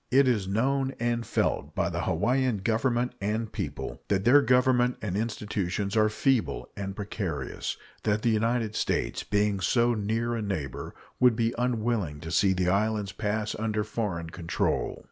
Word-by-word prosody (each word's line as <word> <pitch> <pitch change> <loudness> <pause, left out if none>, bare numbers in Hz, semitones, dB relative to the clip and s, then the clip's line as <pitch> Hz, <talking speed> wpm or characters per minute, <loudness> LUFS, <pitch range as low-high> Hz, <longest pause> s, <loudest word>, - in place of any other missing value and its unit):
It 135 +1 +5
is 105 -6 +1
known 135 +6 0
and 120 0 0
felt 75 +4 -1
by 85 0 0
the 85 0 -2
Hawaiian 120 +7 +1
Government 120 +4 0
and 110 +2 -1
people - - -5
that 95 -1 0
their 140 +4 +7
Government 125 -1 +3
and 100 -4 -3
institutions 105 -2 -2
are 110 -1 +4
feeble 120 +2 0
and 95 -1 -4
precarious; 100 -6 -4 0.2
that 105 0 0
the 115 - +3
United 110 0 +1
States, - - 0
being 105 -1 +1
so 120 +6 +3
near 115 +2 -1
a 115 - -2
neighbor, 90 -11 -4 0.2
would 125 -2 +5
be 115 +1 +1
unwilling 115 -10 -1
to 80 +1 -6
see 95 +2 +4
the 90 -1 +1
islands 105 +1 +1
pass 105 +1 -2
under 110 -1 0
foreign 100 -7 -3
control. 85 -1 -1
110 Hz, 160 wpm, -28 LUFS, 100-120 Hz, 0.2 s, their